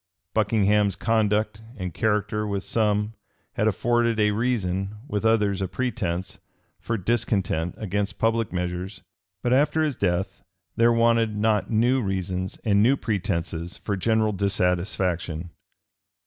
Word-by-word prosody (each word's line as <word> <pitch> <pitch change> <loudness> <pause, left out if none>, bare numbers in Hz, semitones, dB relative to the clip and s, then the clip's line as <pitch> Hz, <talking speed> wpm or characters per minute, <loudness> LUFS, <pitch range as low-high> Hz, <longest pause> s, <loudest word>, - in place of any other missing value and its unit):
Buckingham's 105 -2 +2
conduct 110 -1 +1 0.2
and 90 -4 -4
character 105 +2 0
with 100 -1 -2
some 105 -1 +1 0.4
had 105 - +1
afforded 115 +2 +1
a 105 0 +4
reason, 100 -4 -1
with 105 -5 -2
others 105 -3 +2
a 95 - 0
pretence, 95 -4 -3 0.4
for 115 - -2
discontent 95 -5 0
against 100 -1 -2
public 115 -1 +1
measures 90 +2 -4 0.4
but 120 - +2
after 150 +4 +3
his 150 -4 0
death 95 0 -1 0.3
there 115 +1 +4
wanted 115 -2 +2
not 105 0 +1
new 120 +4 +3
reasons 95 -2 -2
and 100 -2 +3
new 130 +6 +4
pretences 90 -6 -2
for 100 - -3
general 110 +2 +2
dissatisfaction. 90 -3 -1
105 Hz, 125 wpm, -25 LUFS, 95-115 Hz, 0.4 s, a